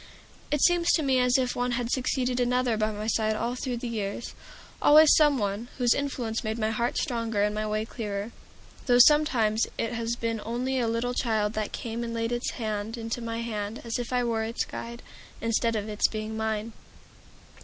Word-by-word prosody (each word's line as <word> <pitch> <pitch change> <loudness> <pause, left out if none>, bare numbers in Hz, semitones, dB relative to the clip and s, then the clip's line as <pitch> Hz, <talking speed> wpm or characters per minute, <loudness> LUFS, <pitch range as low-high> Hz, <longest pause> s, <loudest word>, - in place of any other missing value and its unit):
It 295 -1 0
seems 350 -1 +4
to 315 - +2
me 265 -2 +3
as 250 0 +4
if 255 -1 0
one 245 0 0
had 240 0 -2
succeeded 255 -1 0
another 250 -1 +1
by 215 0 0
my 210 0 -5
side 220 -1 +1
all 235 +3 -1
through 250 -1 -3
the 240 - -5
years, 215 -1 -4 0.5
always 305 +1 +7
some 295 -3 +4
one 205 +1 -2
whose 245 -3 +4
influence 250 -5 -2
made 220 0 -2
my 220 -1 0
heart 235 +2 -1
stronger 230 -4 -1
and 210 0 +1
my 215 0 -2
way 215 +1 -1
clearer; 210 -2 -5 0.6
though 245 -1 +5
sometimes 245 -6 +4
it 230 - -2
has 230 0 -2
been 230 -2 -2
only 255 +3 -1
a 235 - +1
little 230 +2 -1
child 220 -4 0
that 215 -2 -2
came 230 0 -4
and 230 0 -4
laid 230 0 -1
its 240 +1 -1
hand 215 -1 -3
into 230 +1 -4
my 230 0 -3
hand 215 -1 -4
as 230 0 -3
if 240 0 -5
I 250 -1 +1
were 230 -2 0
its 225 +1 -2
guide, 235 +1 -7 0.4
instead 230 0 0
of 210 -1 -2
its 210 -1 +2
being 215 0 -5
mine. 220 0 -2
230 Hz, 200 wpm, -27 LUFS, 220-245 Hz, 0.6 s, always